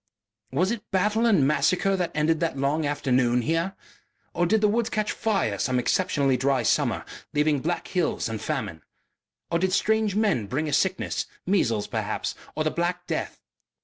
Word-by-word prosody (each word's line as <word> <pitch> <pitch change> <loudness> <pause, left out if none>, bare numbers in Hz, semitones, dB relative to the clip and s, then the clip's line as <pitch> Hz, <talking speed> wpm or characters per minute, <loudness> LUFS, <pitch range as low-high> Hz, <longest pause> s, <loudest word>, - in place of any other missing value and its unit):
Was 180 - +1
it 235 -3 -5
battle 210 +5 +2
and 190 -12 +4
massacre 185 +6 +2
that 180 -2 -1
ended 155 +1 +2
that 165 -4 -1
long 145 +3 0
afternoon 125 -4 +1
here? 165 +6 0 0.6
Or 175 - +1
did 220 +3 +2
the 210 - +5
woods 230 +2 +1
catch 215 0 -1
fire 195 - 0
some 130 -1 +1
exceptionally 135 -1 +1
dry 135 +1 +1
summer, - - +1 0.3
leaving 150 -1 +2
black 170 +6 -2
hills 180 -9 0
and 110 -2 -4
famine? - - -3 0.7
Or 170 - +2
did 185 +1 0
strange 215 0 +2
men 205 - +1
bring 150 +8 -2
a 150 - -2
sickness 190 0 0 0.2
measles, 115 - +1
perhaps, - - -3 0.2
or 155 - 0
the 155 - 0
black 175 +1 -2
death? - - -4
165 Hz, 170 wpm, -25 LUFS, 140-195 Hz, 0.7 s, the